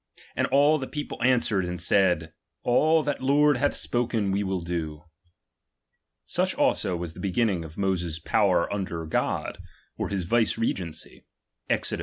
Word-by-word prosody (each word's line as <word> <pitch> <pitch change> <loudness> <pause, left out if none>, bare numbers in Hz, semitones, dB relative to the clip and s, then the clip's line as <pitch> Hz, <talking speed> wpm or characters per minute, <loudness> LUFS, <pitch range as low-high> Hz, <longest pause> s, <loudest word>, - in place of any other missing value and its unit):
And - - +1
all 145 +3 +4
the 130 - -4
people 150 -1 -6
an 125 0 +4
swered, 95 -4 0
and 90 0 -4
said: 90 -3 +2 0.3
All 155 +6 +3
that 145 0 -2
the - - -6
Lord 145 0 +4
hath 145 +3 +1
spohen 115 -4 0
we 100 +1 0
will 95 -2 -2
do. 80 -3 -4 1.2
Such - - 0
also 90 - +1
was 85 -1 -5
the - - -12
beginning 100 -2 0
of 80 0 -11
Moses's 90 -5 -1
power 95 0 +2
under 90 -5 -3
God, 80 - -2 0.4
or - - -2
his 100 -2 -2
vicegerency, 105 -6 -1 0.4
{Exod. - - 0
95 Hz, 155 wpm, -26 LUFS, 85-125 Hz, 1.2 s, all